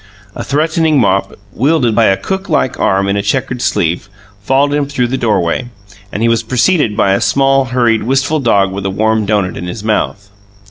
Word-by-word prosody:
A - - -6
threatening 155 +1 +1
mop, 95 -4 0 0.2
wielded 135 -2 +1
by 115 +1 +3
a 95 -1 +3
cooklike 190 -9 -2
arm 95 +1 +1
in 100 - 0
a 100 - 0
checkered 125 +3 -2
sleeve, 90 -2 -1 0.3
followed 135 +6 +1
him 145 -1 0
through 125 -4 -1
the 130 - -1
doorway, 110 -2 0 0.4
and 105 - -3
he - - +3
was 115 -1 +2
preceded 125 - +1
by 95 - +3
a 100 - 0
small, 135 0 +2
hurried, 120 -3 +1
wistful 135 +6 0
dog 100 -7 +2
with 95 0 -4
a - - -1
warm 110 +2 0
doughnut 100 -4 0
in 90 - -6
his 100 +4 -6
mouth. 105 -2 -2
115 Hz, 190 wpm, -14 LUFS, 100-135 Hz, 0.4 s, by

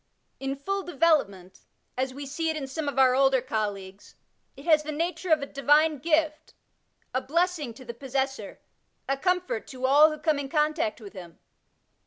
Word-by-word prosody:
In 270 0 -3
full 390 +8 -3
development, 280 - 0 0.4
as 260 +1 -1
we 280 +2 -7
see 320 +4 -2
it 315 - -2
in 285 - -4
some 285 +2 -3
of 275 - -7
our 260 -1 +5
older 265 0 +4
colleagues, 205 -5 -5 0.4
it 275 - -12
has 310 -3 +5
the 305 0 -5
nature 340 +3 -3
of 310 -2 +4
a - - -2
divine 295 +2 +2
gift, 315 +1 0 0.6
a 255 - 0
blessLog 320 -5 -1
to 260 - -13
the 235 - -6
possessor, 270 +2 -3 0.5
a 275 - +1
comfort 360 - -1
to 260 -1 -5
all 290 +4 +6
who 305 - -5
come 305 -1 0
in 275 -1 -5
contact 310 0 0
with 205 -2 -11
him. 175 -4 -11
280 Hz, 180 wpm, -27 LUFS, 260-315 Hz, 0.6 s, all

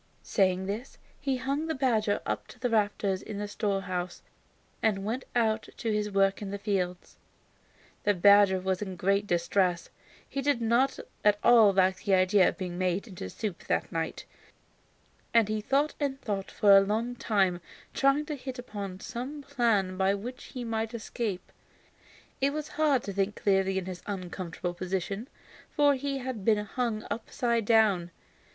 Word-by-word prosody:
Saying 190 -2 +1
this, 215 +7 -5 0.2
he 270 -2 -1
hung 275 +5 -2
the 320 - -1
badger 220 -6 +1
up - - -3
to - - -14
the 245 -1 -1
rafters 205 -3 +1
of - - -14
his 205 0 -5
storehouse 185 -4 -2 0.6
and 200 -3 +1
went 235 +5 -3
out 220 -2 +1
to 225 - -2
his 210 0 0
work 195 0 +2
in 200 - -4
the 200 - -4
fields. 185 -3 -3 0.8
The 205 -1 +2
badger 200 +1 +6
was 185 0 -1
in 190 -3 -4
great 200 +3 +1
distress, 175 0 +1
for - - -36 0.3
he 275 - -3
did 285 -2 +1
not 235 +4 +2 0.3
at 210 -1 +5
all 230 -4 +7
like 190 -1 +3
the 195 -2 +4
idea 185 +1 +4
of - - -7
being 180 -1 -5
made 185 +4 0
into 180 - -7
soup 200 - -5
that - - 0
night, 165 -1 -3 1.1
and 230 -3 +6
he 215 0 -1
thought 280 +7 +1
and 275 -2 -1
thought 200 -6 -3
for 200 -1 +5
a 195 - +8
long 220 +5 -1
time, 195 -7 +1 0.3
trying 275 +2 +2
to 300 - -4
hit 260 -1 -7
upon 200 -6 -6
some 275 +5 -6
plan 225 -9 +1
by 190 +1 +2
which 245 +6 -7
he 250 - -7
might 225 0 -2
escape. 215 -4 -4 0.9
It 275 +1 +2
was 305 0 -4
hard 295 -5 +2
to 200 - -5
think 195 +1 0
clearly 195 -1 +1
in 190 - -2
his 185 -1 -6
uncomfortable 180 -2 -4
position, 190 +5 -3 0.4
for 290 -2 +4
he 275 +1 -2
had 255 -5 -5
been 210 0 +2
hung 230 0 -2
upside 235 -1 -1
down. 205 -6 +3
210 Hz, 170 wpm, -29 LUFS, 190-240 Hz, 1.1 s, a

